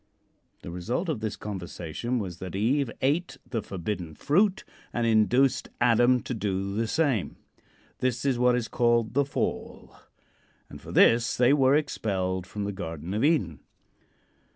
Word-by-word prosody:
The - - -7
result 115 - -3
of 145 -8 -1
this 110 -1 -3
conversation 95 +3 -4
was 90 -6 -5
that 95 0 -6
Eve 125 +6 +1
ate 145 +1 0
the 115 -3 -2
forbidden 90 -4 -5
fruit 195 +6 +2 0.3
and 120 - -1
induced 115 +4 +3
Adam 120 +1 +4
to - - -4
do 100 -2 -2
the 115 +2 -1
same. 135 - 0 0.6
This 125 0 -1
is 130 -3 +1
what 125 0 +4
is 120 -2 -1
called 120 -2 +1
the 140 +2 +2
"Fall," 140 - -4 0.8
and - - -10
for - - -10
this 120 +3 +4
they 125 +2 +5
were 135 -1 +4
expelled 95 - -1
from 105 +1 -5
the 100 - -2
Garden 85 -2 -6
of 110 +4 0
Eden. 135 - +1
115 Hz, 150 wpm, -27 LUFS, 95-130 Hz, 0.8 s, they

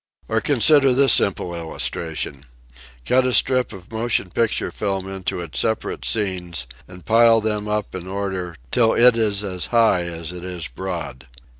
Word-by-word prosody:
Or 110 0 0
consider 140 -1 +4
this 135 -2 +6
simple 90 -2 +1
illustration: 80 -3 -4 0.6
Cut 130 +1 +3
a 130 - 0
strip 130 0 +3
of 95 +1 -12
motion 110 -4 -1
picture 115 +3 -1
film 95 -2 -3
into 95 -2 -4
its 85 -3 -4
separate 110 0 -2
scenes 90 - -1 0.2
and 90 -2 -14
pile 115 0 +5
them 105 -1 -2
up 105 0 -3
in 95 -1 -7
order 95 -3 -4 0.2
till 115 -2 +3
it 120 0 +5
is 105 -3 0
as 90 -3 -3
high 115 -7 +2
as 85 -1 -6
it 90 -1 -9
is 90 -2 -5
broad. 85 -9 -7
100 Hz, 160 wpm, -21 LUFS, 90-115 Hz, 0.6 s, this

